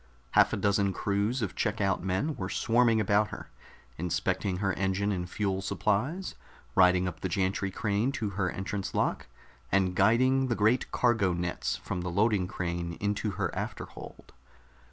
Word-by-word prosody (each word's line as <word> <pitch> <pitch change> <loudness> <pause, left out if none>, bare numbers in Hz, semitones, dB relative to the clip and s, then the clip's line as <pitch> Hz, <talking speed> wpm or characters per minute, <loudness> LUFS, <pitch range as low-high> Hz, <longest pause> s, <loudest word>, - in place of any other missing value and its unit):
Half - - +5
a - - -1
dozen 100 -1 +2
crews 105 +6 0
of 100 - -3
check 105 +2 -1
out 95 -2 +1
men 95 +12 -1
were 95 -1 -4
swarming 115 0 +3
about 105 0 +3
her, - - -9 0.5
inspecting 90 +2 -1
her 95 0 0
engine 95 +2 0
and 90 -2 -3
fuel 95 -2 -1
supplies, 115 - -1 0.4
riding 90 +1 +4
up 85 -3 -5
the 95 - -3
gantry 95 +1 0
crane 105 +5 0
to 105 -6 -2
her 95 -1 -1
entrance 95 +1 -4
lock, - - 0 0.4
and 95 -1 +2
guiding 130 +7 +3
the 120 - 0
great 110 +4 +2
cargo 110 -7 +2
nets 85 0 -2
from 90 - -4
the 90 - -3
loading 100 0 +2
crane 85 -1 -3
into 105 +3 -1
her - - -1
afterhold. - - -7
100 Hz, 160 wpm, -29 LUFS, 95-110 Hz, 0.5 s, Half